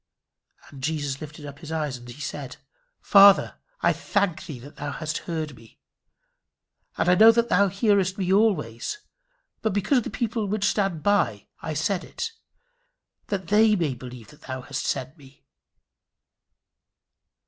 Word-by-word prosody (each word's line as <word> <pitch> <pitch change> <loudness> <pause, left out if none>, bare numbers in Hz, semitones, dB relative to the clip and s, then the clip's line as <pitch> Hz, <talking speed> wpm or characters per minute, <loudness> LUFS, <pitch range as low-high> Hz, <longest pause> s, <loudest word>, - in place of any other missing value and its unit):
"And 140 -2 -12
Jesus 145 -2 -2
lifted 150 0 -9
up 145 0 -9
his 160 -1 -9
eyes, 150 -4 -2
and 120 0 -13
said, 140 +1 -6 0.4
Father, 200 -1 +6 0.2
I - - +3
thank 200 -5 -1
thee 150 - -6
that 140 +5 -13
thou 145 -1 -4
hast 155 -1 -3
heard 155 -4 -3
me. 115 -1 -19 1.2
And - - 0
I 180 - +6
knew 220 +5 +8
that 235 +1 +1
thou 200 +2 +4
hearest 195 -1 +1
me 190 -1 0
always: 195 - +1 0.6
but 220 - 0
because 205 +7 +2
of - - -5
the - - -5
people 220 -1 -2
which 200 0 -1
stand 195 -7 0
by 130 - +1 0.2
I 155 - -4
said 175 +4 0
it, 460 - -5 1.0
that 190 -4 -3
they 215 +1 +5
may 165 -8 0
believe 125 -2 -10
that 150 - -18
thou 130 -1 -6
hast - - -4
sent 135 +3 -3
me." 135 -1 -18
160 Hz, 155 wpm, -25 LUFS, 140-200 Hz, 1.2 s, knew